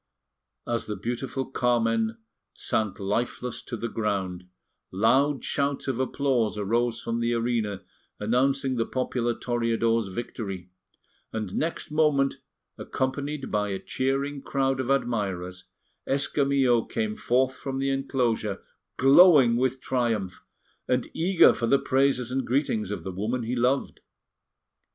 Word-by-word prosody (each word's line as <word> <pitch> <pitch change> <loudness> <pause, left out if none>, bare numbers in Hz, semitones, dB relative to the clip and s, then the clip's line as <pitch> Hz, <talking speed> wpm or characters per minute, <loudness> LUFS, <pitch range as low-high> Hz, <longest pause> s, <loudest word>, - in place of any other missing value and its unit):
As 120 -1 -2
the 105 - -3
beautiful 120 +6 -3
Carmen 115 -3 +1 0.4
sank 100 -3 -1
lifeless 115 +4 -2
to 120 - -6
the 115 - -3
ground, 95 -5 -2 0.5
loud 130 +7 +2
shouts 140 -1 -1
of 130 -2 -1
applause 130 -5 0
arose 115 +3 0
from 115 0 -3
the 120 0 +1
arena 115 -5 -1 0.4
announcing 130 +4 +1
the 115 - +1
popular 125 -2 -1
Toreador's 115 -2 0
victory, 95 -3 -6 0.6
and 110 -4 -4
next 165 0 -2
moment, 150 -3 +2 0.4
accompanied 140 +2 -3
by 105 -1 0
a 95 - -2
cheering 135 +5 -2
crowd 135 -1 0
of 130 -1 -2
admirers, 95 -9 -1 0.4
Escamillo 135 -3 +2
came 110 -2 -2
forth 130 +3 +1
from 135 0 -5
the 135 0 0
enclosure 125 -7 -1 0.4
glowing 135 -3 +7
with 130 +1 0
triumph, 115 -8 -1 0.4
and 125 -1 0
eager 175 +2 +5
for 115 - -2
the 140 - +5
praises 130 -2 +1
and 130 0 -1
greetings 120 -6 0
of 105 - -4
the 95 - -4
woman 110 +7 -2
he 120 +3 -2
loved. 125 +3 0
120 Hz, 130 wpm, -26 LUFS, 110-135 Hz, 0.6 s, glowing